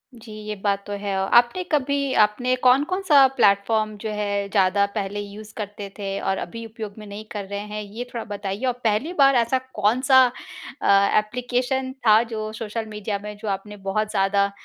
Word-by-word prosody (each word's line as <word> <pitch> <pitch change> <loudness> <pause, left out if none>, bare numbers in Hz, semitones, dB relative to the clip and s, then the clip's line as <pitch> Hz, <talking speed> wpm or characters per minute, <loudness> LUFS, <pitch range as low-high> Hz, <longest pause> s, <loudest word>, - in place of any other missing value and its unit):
जी 225 -1 -13 0.2
ये 210 - -3
बात 200 -1 0
तो 205 - -5
है। 200 -1 -2
औ 190 - 0
आपने 245 +10 -1
कभी 280 -1 0
आपने 245 +5 +2
कौन-कौन-सा 290 +3 +5
प्लेटफ़ॉर्म 215 +2 +3
जो 220 - -3
है 205 -1 -2
ज़्यादा 200 0 +3
पहले 205 -1 -3
यूज़ 205 +1 -9
करते 205 -1 -6
थे 200 -1 -3
और 195 0 -1
अभी 230 +3 -6
उपयोग 220 -2 -7
में 215 - -9
नहीं 205 +2 -8
कर 205 -2 -5
रहे 200 0 -3
हैं 210 +1 -6
ये 210 +4 -6
थोड़ा 230 -2 -3
बताइए? 205 +2 -4
और 250 - +1
पहली 225 +10 0
बार 275 -1 +6
ऐसा 235 +2 +2 0.2
कौन-सा 260 +5 +4 0.6
अ, 200 +1 +4
एप्लीकेशन 250 +4 -2 0.2
था 215 +1 +7
जो 215 0 -4
सोशल 225 +1 -3
मीडिया 210 -1 -4
में 210 0 -6
जो 220 - -6
आपने 210 +1 -12
बहुत 215 +2 -1
ज़्यादा 200 +1 +2
215 Hz, 185 wpm, -23 LUFS, 200-245 Hz, 0.6 s, था